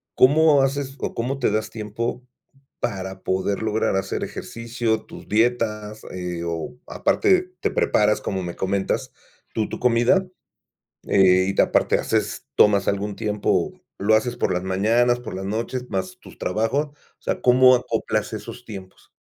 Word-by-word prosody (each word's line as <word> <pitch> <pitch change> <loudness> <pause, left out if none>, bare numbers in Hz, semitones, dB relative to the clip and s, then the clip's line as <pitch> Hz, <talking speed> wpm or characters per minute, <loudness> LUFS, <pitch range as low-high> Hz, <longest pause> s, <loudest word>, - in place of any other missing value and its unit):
¿cómo 145 +1 +5
haces 135 0 -1
o - - -3
cómo 130 +4 -2
te 125 - +2
das 110 +1 -1
tiempo 115 +3 -4 0.5
para 95 -4 -4
poder 95 +2 -1
lograr 110 -2 0
hacer 95 - -2
ejercicio, 115 -1 -3
tus - - -12
dietas, 110 -2 0
eh, 90 -2 -4
o 85 +9 -4
aparte 370 -2 +2
te - - 0
preparas, 105 0 +2
como 95 -2 -3
me 85 -1 -5
comentas, 95 0 -1 0.4
tu 110 -1 -1
tu - - -5
comida? 125 +10 +3 0.8
Eh, 95 -1 +5
y - - -2
¿te - - +5
aparte - - +2
haces - - -1
tomas 100 -2 +4
algún 100 0 -1
tiempo, 105 - 0 0.3
lo 105 +3 +3
haces 120 +3 0
por 95 - 0
las 90 - -1
mañanas, 115 +6 +2
por 120 - -7
las 95 +1 -5
noches, 115 +4 -3
más 95 -2 -3
tus - - -15
trabajos? 115 +10 0
O 145 - -23 0.3
sea, - - -2
¿cómo 130 +1 +6
acoplas 125 - -2
esos 125 - -8
tiempos? 95 -4 -10
110 Hz, 155 wpm, -23 LUFS, 95-125 Hz, 0.8 s, cómo